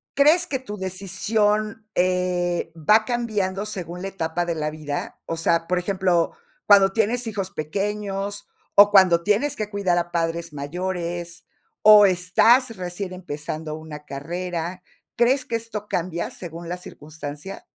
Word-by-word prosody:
¿crees 300 +5 +5
que 270 - -1
tu 230 -5 -7
decisión, 205 +3 -1
eh, 180 -2 0
va 210 +8 +4
cambiando 210 -5 -1
según 180 -4 -6
la 195 - -3
etapa 175 -2 -2
de 170 -1 -2
la 155 -1 -1
vida?, 150 -2 -5
o 165 - -3
sea, 165 0 +1
por 180 - +1
ejemplo, 180 -2 +1 0.3
cuando 195 -1 +6
tienes 230 +4 0
hijos 195 -4 -3
pequeños, 200 +4 -3 0.3
o 205 0 +9
cuando 185 -4 +6
tienes 225 +9 +1
que 215 -4 -4
cuidar 200 -4 0
a 175 0 -4
padres 170 0 -2
mayores, 175 +3 -4 0.4
o 210 -1 +9
estás 225 +7 +3
recién 185 +1 -5
empezando 155 -3 -5
una 155 -1 -9
carrera, 175 +4 -4 0.3
¿crees 250 +3 +3
que 230 - -3
esto 225 -2 -5
cambia 170 -2 -2
según 170 -1 -8
la 180 - -3
circunstancia? 155 +1 -9
185 Hz, 140 wpm, -23 LUFS, 170-210 Hz, 0.4 s, o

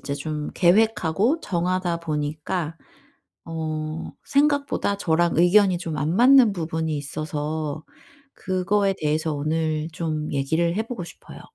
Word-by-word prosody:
이제 140 - -4
좀 150 +1 -4
계획하고 210 - +3
정하다 180 - -1
보니까 155 +1 -3 0.7
어 155 -1 -4
생각보다 280 -7 +1
저랑 170 -2 +1
의견이 180 +2 +5
좀 165 -3 -4
안 150 +4 -1
맞는 250 0 +6
부분이 160 -3 -2
있어서 150 +1 -4 0.5
그거에 195 +2 0
대해서 155 +1 0
오늘 155 +1 -1
좀 155 -2 -3
얘기를 160 +5 0
해 220 - +1
보고 230 -7 -5
싶어요. 170 - -12
165 Hz, 265 characters per minute, -24 LUFS, 155-190 Hz, 0.7 s, 맞는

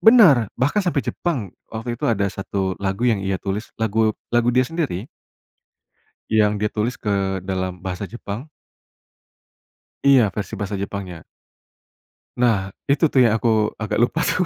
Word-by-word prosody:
Benar, 180 - +7
bahkan 140 - +2
sampai 175 -7 0
Jepang. 125 - -2 0.2
Waktu 115 +2 -4
itu - - +1
ada 105 -4 +2
1 95 -1 -2
lagu 95 +4 -1
yang 115 -5 +3
ia 95 0 -1
tulis, 100 +3 -4
lagu 110 0 +1 0.2
lagu 120 0 +3
dia 125 +1 +4
sendiri. 135 - -3 1.2
Yang 105 -1 +4
dia 105 +1 +1
tulis 115 +3 0
ke 100 -2 0
dalam 95 -1 -3
bahasa 90 +1 -4
Jepang. 115 +6 -6 1.6
Iya, 130 -6 +6
versi 100 +2 -5
bahasa 105 0 -3
Jepangnya. 95 -4 -5 1.1
Nah, 110 -6 +2 0.2
itu, 145 +3 +3
tuh, 135 - +2
ya, - - +5
aku 110 -2 +2
agak 110 - -1
lupa, 120 +8 +2
tuh. 180 - +1
110 Hz, 145 wpm, -22 LUFS, 100-125 Hz, 1.6 s, Benar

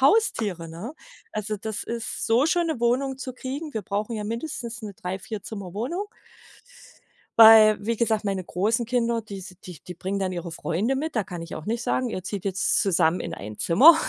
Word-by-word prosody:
Haustiere, 240 - +2
ne? 175 - -7 0.4
Also, 215 0 -2
das 220 +1 -4
ist 230 -1 -4
so 240 +6 +4
schon 345 +1 +2
'ne 290 -7 -2
Wohnung 260 +3 +1
zu 255 -1 -6
kriegen 280 +4 -5
wir 220 - -2
brauchen 210 +4 -2
ja 210 - -3
mindestens 235 0 -4
'ne 205 -2 -6
Drei 185 +1 -4
Vierzimmerwohnung 220 - -5 1.3
weil, 220 -1 +9
wie 230 +1 0
gesagt, 220 -2 +1
meine 195 -2 -1
großen 220 +8 0
Kinder, 235 -1 +1
die 205 -2 -8
s 185 -1 -10
die 180 -5 -9
die 180 - -8
bringen 190 +3 -3
dann 190 -1 -1
ihre 175 -1 -4
Freunde 205 +14 -1
mit. 300 -1 -3
Da 215 - +2
kann 175 -2 -6
ich 165 - -7
auch 155 - -7
nicht 230 +2 -1
sagen: 255 -1 0
„Ihr 185 - -4
zieht 190 0 -5
jetzt 195 -1 +1
zusammen 175 -2 +2
in - - -4
ein 105 +1 -8
Zimmer.”, 285 - +8
215 Hz, 195 wpm, -25 LUFS, 190-245 Hz, 1.3 s, weil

